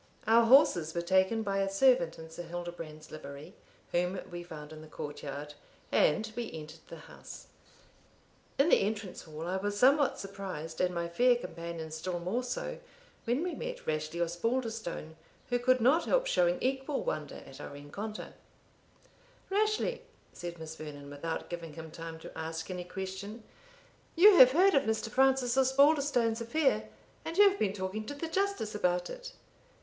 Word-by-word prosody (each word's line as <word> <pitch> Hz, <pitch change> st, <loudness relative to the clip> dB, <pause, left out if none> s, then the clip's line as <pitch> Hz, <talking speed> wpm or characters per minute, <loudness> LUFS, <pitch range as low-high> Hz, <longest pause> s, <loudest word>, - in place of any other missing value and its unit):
Our 230 Hz, +1 st, +5 dB
horses 180 Hz, -, +5 dB
were 170 Hz, -, -1 dB
taken 190 Hz, +5 st, +2 dB
by 195 Hz, -1 st, -1 dB
a 195 Hz, 0 st, +1 dB
servant 195 Hz, -5 st, +3 dB
in 160 Hz, 0 st, -10 dB
Sir 170 Hz, -, -7 dB
Hildebrand's 170 Hz, -3 st, -7 dB
livery, 140 Hz, -1 st, -9 dB, 0.4 s
whom 180 Hz, +2 st, 0 dB
we 175 Hz, 0 st, -5 dB
found 155 Hz, -3 st, -9 dB
in 155 Hz, -, -10 dB
the 155 Hz, -, -11 dB
court 145 Hz, -1 st, -7 dB
yard, 145 Hz, +1 st, -6 dB, 0.4 s
and 220 Hz, +8 st, +2 dB
we 240 Hz, -2 st, -4 dB
entered 155 Hz, 0 st, -9 dB
the 165 Hz, -2 st, -10 dB
house. -, -, -11 dB, 1.1 s
In 275 Hz, +5 st, +4 dB
the -, -, +5 dB
entrance 205 Hz, -2 st, -3 dB
hall 155 Hz, 0 st, -7 dB
I 185 Hz, +2 st, -1 dB
was 205 Hz, +1 st, -2 dB
somewhat 275 Hz, +5 st, +4 dB
surprised, 190 Hz, -5 st, -6 dB
and 180 Hz, -1 st, +1 dB
my 170 Hz, 0 st, -1 dB
fair 245 Hz, +9 st, +4 dB
companion 170 Hz, -7 st, -6 dB
still 165 Hz, +3 st, -3 dB
more 185 Hz, +8 st, -1 dB
so, -, -, -4 dB, 0.5 s
when 245 Hz, +7 st, +1 dB
we 360 Hz, -, -2 dB
met -, -, -6 dB
Rashleigh 155 Hz, +2 st, -1 dB
Osbaldistone, 220 Hz, -3 st, -3 dB, 0.3 s
who 245 Hz, -, +2 dB
could 255 Hz, +1 st, +3 dB
not 265 Hz, +8 st, +4 dB
help -, -, +2 dB
showing 175 Hz, -, +2 dB
equal 270 Hz, +2 st, -1 dB
wonder 150 Hz, -2 st, -3 dB
at 135 Hz, +2 st, -11 dB
our -, -, -6 dB
rencontre. 145 Hz, +10 st, -7 dB, 1.2 s
"Rashleigh," 430 Hz, +4 st, +1 dB, 0.3 s
said 175 Hz, -1 st, -7 dB
Miss 160 Hz, -1 st, -7 dB
Vernon, 145 Hz, -2 st, -9 dB
without 160 Hz, +3 st, -4 dB
giving 170 Hz, -3 st, -6 dB
him 160 Hz, 0 st, -9 dB
time 165 Hz, 0 st, -7 dB
to -, -, -10 dB
ask 160 Hz, +2 st, -5 dB
any 180 Hz, -1 st, -5 dB
question, 190 Hz, +4 st, -6 dB, 0.7 s
"you 385 Hz, +3 st, +8 dB
have 255 Hz, 0 st, +9 dB
heard 375 Hz, +5 st, +5 dB
of 275 Hz, -, +5 dB
Mr. 220 Hz, 0 st, -1 dB
Francis 260 Hz, -1 st, +3 dB
Osbaldistone's 265 Hz, -3 st, +3 dB
affair, 270 Hz, +5 st, +1 dB, 0.3 s
and 330 Hz, -, -5 dB
you 410 Hz, 0 st, +9 dB
have 395 Hz, 0 st, +1 dB
been 195 Hz, -2 st, +1 dB
talking 195 Hz, +2 st, -4 dB
to 285 Hz, -, -5 dB
the 325 Hz, +4 st, -4 dB
Justice 390 Hz, -, -1 dB
about 180 Hz, -3 st, 0 dB
it?" -, -, -8 dB
195 Hz, 165 wpm, -31 LUFS, 165-255 Hz, 1.2 s, have